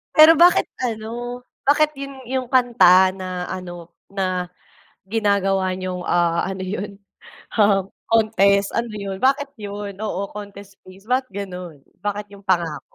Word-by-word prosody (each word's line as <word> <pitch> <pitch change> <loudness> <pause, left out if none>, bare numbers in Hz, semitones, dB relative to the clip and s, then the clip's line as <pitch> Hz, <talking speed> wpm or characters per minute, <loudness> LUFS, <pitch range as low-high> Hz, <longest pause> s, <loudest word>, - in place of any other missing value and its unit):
Pero 310 +1 +9
bakit 350 +2 +5 0.2
ano, 240 +1 -4 0.3
bakit 300 +1 +4
'yun 275 0 -6
'yung 260 0 -2
kanta 235 -8 +5
na 185 -1 -5
ano, 175 -2 -7 0.2
na 185 -2 -2 0.6
ginagawa 195 -3 +1
niyong, 185 -1 -4
ah, 170 -1 +1
ano 190 0 -4
'yun, 200 +1 -5 0.6
um, 200 -2 +3 0.2
contest 200 -3 +3
ano 235 -1 -1
'yun 200 -2 -5
bakit 275 +2 +2
'yun, 205 -1 -6
oo, 210 -2 -3
contest 200 -1 -10
piece 190 +3 -16
ba, 255 +1 +2
ganun, 180 -6 -7 0.2
bakit 205 0 -3
'yung 200 0 -14
Pangako? 175 -4 0
200 Hz, 135 wpm, -21 LUFS, 185-225 Hz, 0.6 s, Pero